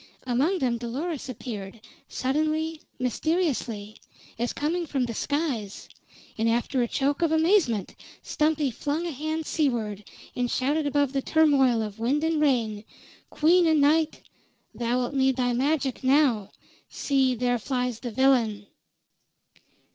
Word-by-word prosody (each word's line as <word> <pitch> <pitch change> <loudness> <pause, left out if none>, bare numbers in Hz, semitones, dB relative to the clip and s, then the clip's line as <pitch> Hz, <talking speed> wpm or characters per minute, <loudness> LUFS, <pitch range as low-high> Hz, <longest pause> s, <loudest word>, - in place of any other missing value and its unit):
Among 270 +10 +1
them 245 -7 0
Dolores 275 +5 -4
appeared, 220 -4 -7 0.3
suddenly, 310 +4 -1 0.2
mysteriously, 250 - -2 0.4
as 240 +1 0
coming 335 +3 -2
from 270 -4 0
the 235 - -4
skies, 265 -7 -3 0.5
and 225 +1 +2
after 240 +3 0
a 240 - +1
choke 280 +5 -1
of 335 -2 +2
amazement 320 - +2 0.3
Stumpy 300 -3 0
flung 295 +8 -2
a 340 - -2
hand 310 +3 -3
seaward, 225 -11 -1 0.3
and 245 -1 -1
shouted 290 +5 0
above 285 -1 +1
the 270 - 0
turmoil 270 -7 +3
of 210 0 -7
wind 270 +7 0
and 320 -1 +1
rain: 230 -7 +1 0.5
"Queen 340 +3 +4
o' 320 - +4
Night, 305 +2 +2 0.5
thou'lt 245 +2 -1
need 265 -1 +2
thy 245 -1 0
magic 270 +1 0
now! 260 -7 +3 0.4
See, 265 -3 +1
there 245 0 0
flies 250 -1 -2
the 245 - -5
villain!" 235 -4 +2
265 Hz, 130 wpm, -26 LUFS, 240-310 Hz, 0.5 s, Queen